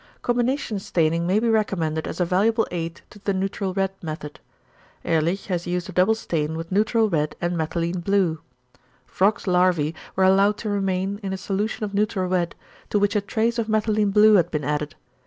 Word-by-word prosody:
Combination 245 Hz, -2 st, 0 dB
staining 170 Hz, -2 st, 0 dB
may 195 Hz, +4 st, +3 dB
be 235 Hz, -, 0 dB
recommended 180 Hz, -8 st, 0 dB
as 165 Hz, -, -6 dB
a 180 Hz, -, +2 dB
valuable 220 Hz, +6 st, +2 dB
aid 165 Hz, -1 st, -4 dB
to 210 Hz, -, -14 dB
the 200 Hz, -1 st, -1 dB
neutral 195 Hz, 0 st, -2 dB
red 195 Hz, 0 st, 0 dB
method. 155 Hz, -2 st, -7 dB, 0.7 s
Ehrlich 165 Hz, +4 st, 0 dB
has 175 Hz, -3 st, -3 dB
used 180 Hz, +1 st, -2 dB
a -, -, -5 dB
double 185 Hz, +5 st, +3 dB
stain 160 Hz, -7 st, -2 dB
with 165 Hz, +2 st, -7 dB
neutral 220 Hz, +3 st, +2 dB
red 155 Hz, -6 st, -1 dB
and 175 Hz, 0 st, -1 dB
methylene 170 Hz, +2 st, -2 dB
blue. 185 Hz, -4 st, +1 dB, 0.7 s
Frog's 205 Hz, +3 st, +1 dB
larvæ 180 Hz, -4 st, +2 dB, 0.2 s
were 190 Hz, -, +2 dB
allowed 195 Hz, +2 st, +4 dB
to 215 Hz, -, -4 dB
remain 195 Hz, 0 st, -1 dB
in 195 Hz, -2 st, -3 dB
a -, -, -3 dB
solution 210 Hz, +4 st, -2 dB
of 205 Hz, -1 st, -3 dB
neutral 200 Hz, -2 st, 0 dB
red, 180 Hz, -2 st, 0 dB, 0.3 s
to -, -, +1 dB
which 205 Hz, +1 st, +1 dB
a 210 Hz, -, +3 dB
trace 230 Hz, +3 st, -1 dB
of 225 Hz, -, -1 dB
methylene 215 Hz, -1 st, +2 dB
blue 215 Hz, +1 st, +6 dB
had 175 Hz, -4 st, +4 dB
been 150 Hz, -3 st, -2 dB
added. 150 Hz, +1 st, -2 dB
190 Hz, 190 wpm, -23 LUFS, 170-210 Hz, 0.7 s, blue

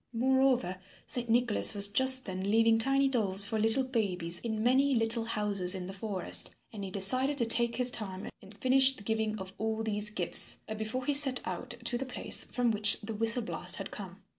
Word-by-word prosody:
Moreover, 255 Hz, -5 st, -1 dB, 0.3 s
Saint 240 Hz, -2 st, -4 dB
Nicholas 235 Hz, -2 st, +1 dB
was 200 Hz, 0 st, +6 dB
just 260 Hz, +5 st, +3 dB
then 190 Hz, 0 st, -6 dB
leaving 225 Hz, +1 st, +1 dB
tiny 275 Hz, +3 st, 0 dB
dolls 205 Hz, -7 st, -3 dB
for 220 Hz, +1 st, -3 dB
little 225 Hz, +5 st, +2 dB
babies 185 Hz, -9 st, 0 dB
in 220 Hz, -2 st, -5 dB
many 265 Hz, +3 st, +1 dB
little 225 Hz, 0 st, 0 dB
houses 200 Hz, -4 st, +1 dB
in 185 Hz, -1 st, -7 dB
the 190 Hz, -, -9 dB
forest 195 Hz, -2 st, 0 dB, 0.2 s
and 205 Hz, -2 st, -9 dB
he 195 Hz, -, -7 dB
decided 255 Hz, +9 st, +1 dB
to 235 Hz, -, +2 dB
take 235 Hz, +1 st, +2 dB
his 250 Hz, 0 st, +4 dB
time 195 Hz, -5 st, -4 dB
and 200 Hz, +1 st, -18 dB
finish 265 Hz, +2 st, +2 dB
the 205 Hz, -, -12 dB
giving 220 Hz, 0 st, -4 dB
of 190 Hz, -1 st, -10 dB
all 220 Hz, 0 st, -4 dB
these 210 Hz, -1 st, +1 dB
gifts 180 Hz, -5 st, +3 dB
before 220 Hz, +4 st, -6 dB
he 290 Hz, -, -1 dB
set 275 Hz, -3 st, +4 dB
out 245 Hz, -1 st, -6 dB
to 240 Hz, +1 st, -3 dB
the 270 Hz, -, -5 dB
place 250 Hz, -, +3 dB
from 245 Hz, -2 st, -2 dB
which 210 Hz, -1 st, +1 dB
the 220 Hz, +2 st, -8 dB
whistle 225 Hz, +3 st, +1 dB
blast -, -, 0 dB
had -, -, -8 dB
come. -, -, -12 dB
225 Hz, 200 wpm, -28 LUFS, 205-250 Hz, 0.3 s, was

